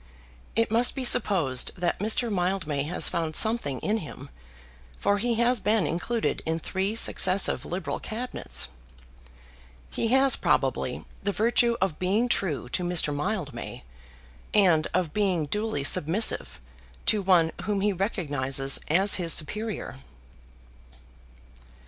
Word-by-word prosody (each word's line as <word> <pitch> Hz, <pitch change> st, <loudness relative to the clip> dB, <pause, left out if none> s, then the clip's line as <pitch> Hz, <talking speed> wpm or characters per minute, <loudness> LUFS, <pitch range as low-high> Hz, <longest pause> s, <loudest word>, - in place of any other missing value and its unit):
It 230 Hz, -1 st, 0 dB
must 235 Hz, +2 st, +3 dB
be 265 Hz, -2 st, -2 dB
supposed 155 Hz, -, +3 dB
that 175 Hz, -1 st, -2 dB
Mr. 220 Hz, +3 st, +2 dB
Mildmay 175 Hz, -6 st, -2 dB
has 165 Hz, -, +2 dB
found 160 Hz, -2 st, -2 dB
something 220 Hz, -, +2 dB
in 215 Hz, +2 st, -1 dB
him, 155 Hz, -, -10 dB, 0.7 s
for 200 Hz, 0 st, 0 dB
he 235 Hz, +2 st, -1 dB
has 240 Hz, +1 st, +1 dB
been 215 Hz, 0 st, 0 dB
included 225 Hz, +7 st, -2 dB
in 160 Hz, 0 st, -2 dB
three 190 Hz, +5 st, -3 dB
successive 190 Hz, -3 st, +4 dB
liberal 180 Hz, +3 st, -5 dB
Cabinets. 240 Hz, +3 st, -3 dB, 1.2 s
He 230 Hz, -, -2 dB
has 265 Hz, +3 st, +3 dB
probably -, -, -1 dB, 0.2 s
the 200 Hz, -, -1 dB
virtue 235 Hz, +2 st, +1 dB
of 185 Hz, -5 st, -2 dB
being 200 Hz, +6 st, 0 dB
true 170 Hz, -, -2 dB
to 180 Hz, -, -3 dB
Mr. 175 Hz, -4 st, 0 dB
Mildmay, 165 Hz, -, -5 dB, 0.7 s
and 175 Hz, -7 st, +3 dB
of 175 Hz, -4 st, -2 dB
being 190 Hz, -7 st, 0 dB
duly 210 Hz, -2 st, -3 dB
submissive 150 Hz, -, +3 dB, 0.5 s
to 210 Hz, -, +1 dB
one 175 Hz, -4 st, +2 dB
whom 205 Hz, -2 st, -2 dB
he 205 Hz, 0 st, +1 dB
recognises 145 Hz, -, 0 dB
as 190 Hz, +6 st, +3 dB
his 165 Hz, -2 st, +3 dB
superior. 210 Hz, 0 st, -3 dB
190 Hz, 125 wpm, -25 LUFS, 160-220 Hz, 1.2 s, successive